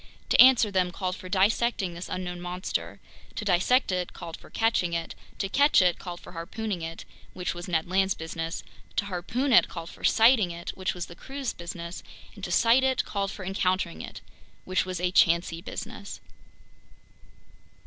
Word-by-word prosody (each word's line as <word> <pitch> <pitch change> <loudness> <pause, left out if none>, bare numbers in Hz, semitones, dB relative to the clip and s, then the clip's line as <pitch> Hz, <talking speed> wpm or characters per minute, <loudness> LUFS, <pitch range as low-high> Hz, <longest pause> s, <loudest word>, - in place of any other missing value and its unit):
To - - +7
answer 250 -4 +7
them 185 -2 +2
called 185 0 -3
for 185 - -10
dissecting 200 0 +2
this 170 +2 -7
unknown 180 -1 -4
monster; 180 +1 -4 0.4
to 210 - -4
dissect 195 +6 +3
it 180 -1 -2
called 165 - -7
for - - -15
catching 225 -6 +1
it; 170 0 -2 0.2
to 195 - -1
catch 285 +9 +4
it 180 -2 +3
called 175 -2 -7
for - - -12
harpooning 185 +3 -4
it—which 165 +2 -6
was 175 0 -7
Ned 165 -2 0
Land's 190 +1 +2
business; 165 +1 -5 0.3
to - - +1
harpoon 220 +8 -1
it - - +7
called 165 -1 -7
for - - -15
sighting 225 -4 +5
it—which 175 +2 -4
was 175 - -4
the - - -11
crew's 270 +5 -5
business; 170 0 -7 0.3
and 200 - -13
to 175 - -3
sight 230 +7 +5
it 265 -1 +2
called 200 -1 -2
for 195 -1 -7
encountering 185 -2 0
it—which 185 0 -5
was 185 -2 -3
a 180 0 0
chancy 170 -1 +3
business. 215 +2 -7
185 Hz, 170 wpm, -27 LUFS, 175-210 Hz, 0.4 s, To